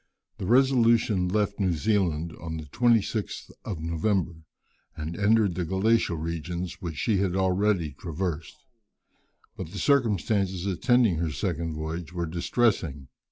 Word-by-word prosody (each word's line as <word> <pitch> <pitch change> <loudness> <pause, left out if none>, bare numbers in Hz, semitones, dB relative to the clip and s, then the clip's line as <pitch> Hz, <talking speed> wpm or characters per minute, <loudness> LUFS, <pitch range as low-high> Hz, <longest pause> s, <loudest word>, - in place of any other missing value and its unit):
The 95 - -4
Resolution 115 -6 +4
left 100 +2 0
New 95 -3 +2
Zealand 85 -4 0
on 80 -1 -5
the 80 - -6
26th 110 - 0
of 90 -6 -5
November, 85 +2 0 0.6
and 80 +2 -4
entered 105 0 +3
the 90 +1 -2
glacial 95 +1 +1
regions 85 +3 -4
which 85 -4 -5
she 105 +4 +1
had 95 -2 0
already 95 -3 +1
traversed; 85 - -5 0.9
but - - -6
the 100 - -8
circumstances 100 - +1
attending 105 0 +2
her 85 0 -1
second 80 +2 -3
voyage 80 +2 -5
were 85 -1 -2
distressing. 85 - 0
90 Hz, 130 wpm, -27 LUFS, 85-105 Hz, 0.9 s, Resolution